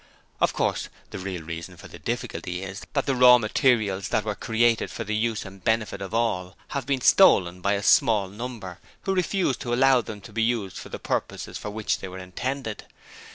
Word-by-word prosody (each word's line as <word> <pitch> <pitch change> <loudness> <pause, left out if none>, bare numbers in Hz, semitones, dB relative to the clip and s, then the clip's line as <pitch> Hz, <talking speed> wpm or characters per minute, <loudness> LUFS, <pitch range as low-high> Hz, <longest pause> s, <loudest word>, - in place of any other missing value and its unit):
Of - - +3
course, - - -1 0.2
the - - -6
real 90 -3 -5
reason 85 +2 -7
for - - -11
the - - -12
difficulty 90 +1 -4
is 95 +1 -6
that 140 - 0
the 135 - +1
raw 125 -1 +8
materials 110 -4 +1
that - - +1
were 105 - -2
created 115 +3 +1
for 115 - -5
the 110 0 -2
use 110 0 -1
and 95 0 -12
benefit 110 -3 0
of 95 -1 -5
all 105 -5 -1
have 140 -1 -3
been 135 -2 0
stolen 90 - +5
by 100 +2 +2
a 100 0 -1
small 105 -2 +4
number, 105 -3 -7 0.2
who 195 - 0
refuse 185 -6 +1
to 120 -3 -2
allow 130 0 +5
them 110 -2 -8
to 95 - -13
be 115 - 0
used 110 -5 0
for - - -9
the - - -5
purposes - - -3
for - - -5
which 110 0 -1
they - - -6
were 95 0 -8
intended. 110 +5 -4
110 Hz, 205 wpm, -25 LUFS, 95-120 Hz, 0.2 s, raw